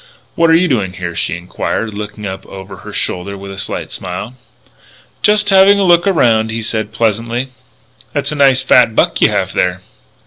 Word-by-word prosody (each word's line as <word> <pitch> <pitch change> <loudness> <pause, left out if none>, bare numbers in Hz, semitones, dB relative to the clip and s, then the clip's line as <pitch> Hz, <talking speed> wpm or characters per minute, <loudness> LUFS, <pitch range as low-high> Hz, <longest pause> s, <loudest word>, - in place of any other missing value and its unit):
"What 165 0 +2
are 165 - +6
you 180 +2 +3
doing 105 - -1
here?" 90 -2 -5
she 85 0 -2
enquired, 105 +5 -4
looking 105 0 -7
up 95 -1 -6
over 95 0 -10
her - - -10
shoulder 100 +2 -3
with 100 0 -9
a 95 - -9
slight - - -4
smile. 95 +6 -6 0.9
"Just 210 -1 +3
having 195 +1 +6
a 200 - +1
look 175 0 +4
around," 115 - +2
he 110 0 -3
said 110 -1 -2
pleasantly. 115 +3 -1 0.6
"That's - - -2
a - - -3
nice 135 -2 +4
fat 120 -3 +4
buck - - +1
you - - +5
have - - -1
there." 90 0 0
110 Hz, 185 wpm, -15 LUFS, 95-140 Hz, 0.9 s, are